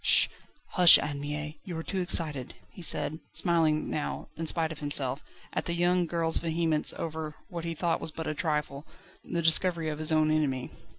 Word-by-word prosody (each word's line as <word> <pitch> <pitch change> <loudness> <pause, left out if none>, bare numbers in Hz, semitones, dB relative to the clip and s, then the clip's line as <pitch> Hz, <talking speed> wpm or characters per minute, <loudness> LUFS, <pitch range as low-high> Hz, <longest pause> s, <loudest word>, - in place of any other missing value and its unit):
"Sh! - - +5 0.4
Hush, 180 -3 +9
Anne 145 -1 -4
Mie! 150 +1 -5
you 175 -3 -6
are 165 - -5
too 190 - -3
excited," 150 -7 +1 0.2
he 200 - -12
said, 155 -1 +1
smiling 160 -3 +1
now, 150 - -4
in 165 0 -5
spite 160 0 0
of 155 - -8
himself, 145 -2 -1 0.3
at - - -2
the 170 - -1
young 175 0 +2
girl's 165 -1 0
vehemence 160 -2 0
over 155 -2 -5
what 170 -3 -6
he 165 0 -3
thought 170 +1 -1
was - - -1
but 160 +1 -7
a - - -2
trifle 150 -2 -3 0.4
the 170 -1 -3
discovery 165 0 +3
of 150 0 -5
his 155 0 0
own 155 0 +3
enemy. 140 -5 -1
160 Hz, 190 wpm, -28 LUFS, 150-170 Hz, 0.4 s, Hush